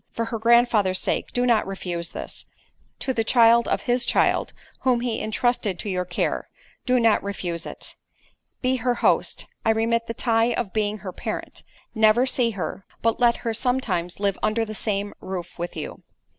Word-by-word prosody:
For 230 - -1
her 230 0 -4
grandfather's 230 -5 +4
sake - - -1
do 245 0 0
not 230 -5 +3
refuse 175 -3 -3
this—to 260 - -8
the 225 -2 0
child 235 0 +5
of - - 0
his 245 0 +1
child, - - +2 0.3
whom 250 -2 +2
he 240 -2 -2
entrusted 220 -3 0
to 205 - -4
your 180 -1 -1
care, 175 - -2 0.4
do 250 0 +4
not 230 -2 +4
refuse 180 -4 -4
it. - - -8 0.7
"Be 255 +1 +2
her 245 0 0
host; - - +1 0.2
I - - +1
remit 230 +1 +1
the 230 - -4
tie 230 0 +2
of 200 -6 -3
being 215 -1 0
her 185 - -3
parent. - - -5 0.3
Never 220 +2 +4
see 255 -2 +2
her—but 220 +2 -3
let 240 -1 +4
her 230 - 0
sometimes 220 -9 -1
live 200 -1 0
under 215 +1 +1
the 215 - -6
same 205 -1 -2
roof 185 -2 -6
with 175 +1 -4
you. 150 - -6
225 Hz, 170 wpm, -24 LUFS, 195-240 Hz, 0.7 s, child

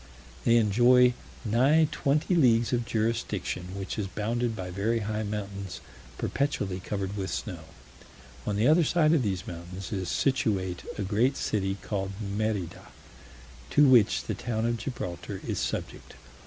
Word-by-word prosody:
They 115 - +5
enjoy 120 +3 +5 0.3
nigh 135 +9 +4
twenty 150 +6 +1
leagues 120 -8 +4
of 120 -1 +1
jurisdiction, 105 -5 -2
which 95 +2 -4
is 100 - -1
bounded 115 +4 -1
by 90 -3 -5
very 110 +5 0
high 105 +1 -2
mountains 100 -2 -5 0.4
perpetually 100 -10 -1
covered 100 +1 -4
with 95 -2 -3
snow. 85 -6 -5 0.8
On 105 - 0
the 105 +4 +3
other 160 +3 +5
side 155 0 +3
of 160 - +4
these 95 -5 -2
mountains 90 +2 -7
is 95 -3 -2
situate 95 -9 0 0.2
a 105 - -2
great 115 +8 +1
city 95 -2 -1
called 95 -2 -3
Merida, 100 -3 -3 0.8
to 145 - +5
which 120 -5 +5
the - - -3
town 110 -1 -2
of 120 0 0
Gibraltar 100 -9 -5
is - - -2
subject. - - -4
105 Hz, 145 wpm, -28 LUFS, 95-120 Hz, 0.8 s, They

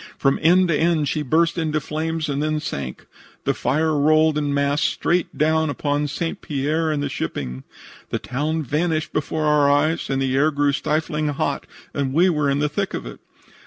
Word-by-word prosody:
From 135 -1 +2
end 180 +3 +5
to 160 - +3
end 160 -2 +2
she 150 - -1
burst 165 +5 +2
into 155 -1 0
flames 160 +2 -3
and 140 0 -1
then 155 0 0
sank. 70 - -5 0.4
The - - +1
fire 155 +5 0
rolled 155 +1 +4
in 145 -1 0
mass 140 +1 +1
straight 175 +1 0
down 160 +1 +2
upon 145 0 -1
St. 155 +4 -4
Pierre 155 +3 -1
and 150 -2 -1
the - - 0
shipping. 65 - -4 0.5
The - - -1
town 155 +5 -2
vanished 155 +3 -1
before 155 +1 -1
our 150 -1 +4
eyes 155 +3 +1
and 135 -1 0
the 135 -1 0
air 145 +3 +4
grew 145 -1 +1
stifling 155 +1 -1
hot, 145 -2 -2 0.3
and 135 -2 -1
we 175 +5 +4
were 150 -4 +1
in 140 - +1
the 150 +1 +1
thick 195 +6 -2
of - - -5
it. - - -9
150 Hz, 195 wpm, -22 LUFS, 140-160 Hz, 0.5 s, end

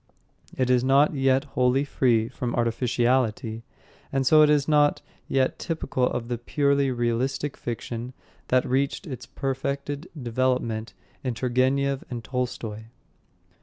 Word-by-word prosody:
It 130 -1 +2
is 125 -1 +3
not 140 +4 +4
yet 135 -1 +2
wholly 135 -1 +1
free 120 -5 +2
from 125 -1 -4
artificiality, 120 -1 0 0.5
and 135 -1 0
so 155 +3 +6
is 150 -2 +4
not 150 -1 +3 0.2
yet 130 -1 +1
typical 160 -6 -1
of 120 -1 -3
the 120 -1 -3
purely 140 +1 +1
realistic 130 +3 -1
fiction 120 +1 -5 0.3
that 130 0 +2
reached 135 +8 0
its 130 -7 -7
perfected 140 +3 -3
development 120 -2 -1 0.3
in 125 -3 -2
Turgenev 130 +3 +1
and 120 -2 -5
Tolstoy. 115 -4 -4
130 Hz, 125 wpm, -25 LUFS, 120-140 Hz, 0.5 s, so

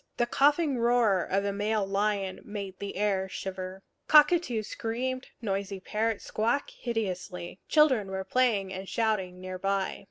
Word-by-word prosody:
The 240 - +3
coughing 285 +2 +3
roar 230 -6 +3
of 195 +1 0
a 200 - 0
male 205 0 0
lion 195 -1 -1
made 200 -3 -6
the 200 - -5
air 195 -1 0
shiver. 190 0 -6 0.2
Cockatoos 300 -7 +5
screamed; 255 +3 -3 0.2
noisy 195 -1 -2
parrots 220 +3 -2
squawked 235 +6 0
hideously. 185 -6 -4
Children 265 -10 +4
were 190 0 -3
playing 200 -3 +1
and 190 0 -6
shouting 200 -5 0
near 185 0 -6
by. 195 0 -1
205 Hz, 140 wpm, -29 LUFS, 190-235 Hz, 0.2 s, Cockatoos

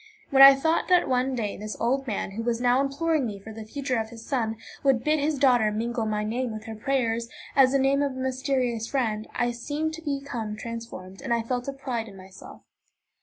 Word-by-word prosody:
When 270 -1 +5
I 275 0 +11
thought 320 +4 +1
that 360 -1 +4
one 255 +1 +1
day 215 -4 -3
this 215 +1 -6
old 270 +3 0
man, 205 -3 -2
who 215 +4 -4
was 230 0 -1
now 245 +1 +3
imploring 290 +2 0
me 210 -4 -4
for 220 +3 -10
the 220 0 -7
future 260 -1 -2
of 220 0 -3
his 230 -1 -11
son, 225 -5 -1 0.3
would 265 -4 +3
bid 305 +2 +2
his 295 +1 0
daughter 245 -5 +4
mingle 230 +1 -2
my 210 0 -1
name 240 +3 -2
with 215 0 -7
her 225 -1 -7
prayers, 235 -1 -1 0.3
as 265 -2 +6
the - - +5
name 275 +1 +2
of 280 -2 0
a - - -10
mysterious 260 -3 -1
friend, 220 -5 -1
I 240 0 +1
seemed 295 +6 -3
to 330 - -7
become 275 -8 -4
transformed, 230 -5 -8
and 265 - -5
I 235 -1 +2
felt 245 +2 -3
a 275 - -2
pride 250 -4 -4
in 195 -2 -12
myself. 190 0 -13
245 Hz, 220 wpm, -26 LUFS, 225-275 Hz, 0.3 s, I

